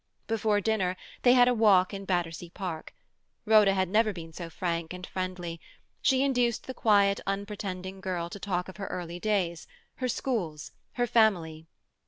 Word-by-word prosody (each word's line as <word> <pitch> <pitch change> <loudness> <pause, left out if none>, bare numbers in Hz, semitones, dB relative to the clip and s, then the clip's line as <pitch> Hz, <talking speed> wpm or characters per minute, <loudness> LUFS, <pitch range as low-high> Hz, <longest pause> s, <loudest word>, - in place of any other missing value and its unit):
Before 215 -2 +1
dinner 190 -4 0 0.2
they 245 - +6
had 245 -1 +6
a 250 - +4
walk 205 -5 +4
in 195 0 -6
Battersea 175 -2 -2
Park. 170 -3 -6 0.5
Rhoda 210 -3 +5
had 190 -1 +1
never 215 +3 +3
been 165 -4 -9
so 170 +1 -7
frank 170 0 -3
and 180 0 -7
friendly; 180 -3 -5 0.4
she 265 -1 +3
induced 245 -4 +1
the 260 - -5
quiet, 200 -4 +3
unpretending 195 -2 -4
girl 180 -3 -2
to 200 - -7
talk 180 -2 -2
of 190 - -10
her 195 - -5
early 175 -1 -5
days, 180 -5 -1 0.3
her 255 - -1
schools, 180 - -2 0.2
her 245 - +1
family. 175 -9 +2
195 Hz, 165 wpm, -28 LUFS, 175-215 Hz, 0.5 s, they